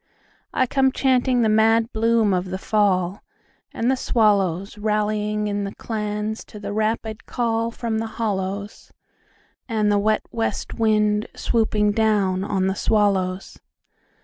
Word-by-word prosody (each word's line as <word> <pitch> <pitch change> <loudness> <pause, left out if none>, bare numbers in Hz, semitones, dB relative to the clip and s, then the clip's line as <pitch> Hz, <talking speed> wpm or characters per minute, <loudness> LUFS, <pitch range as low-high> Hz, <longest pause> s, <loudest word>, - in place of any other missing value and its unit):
I 260 - +2
come 265 +1 +2
chanting 255 -2 +2
the - - +3
mad 225 +2 +3
bloom 225 -2 +2
of 180 0 0
the 185 0 -4
fall. 190 -2 +1 0.5
And 235 +3 0
the - - +2
swallowsRallying 210 0 0
in 205 -1 -2
clans 210 -1 -3
to 210 - -11
the 200 0 -5
rapid 220 0 -1
callFrom 230 -1 -1
the 225 - -3
hollows, 200 -2 -3 0.8
And 215 -2 +1
the 205 - +3
wet 215 +1 +1
west 225 -1 -2
wind 210 -1 +1
swooping 215 -3 +1
down 205 -4 +1
on 195 -2 0
the 190 - +1
swallows. 195 -3 0
215 Hz, 125 wpm, -22 LUFS, 200-225 Hz, 0.8 s, the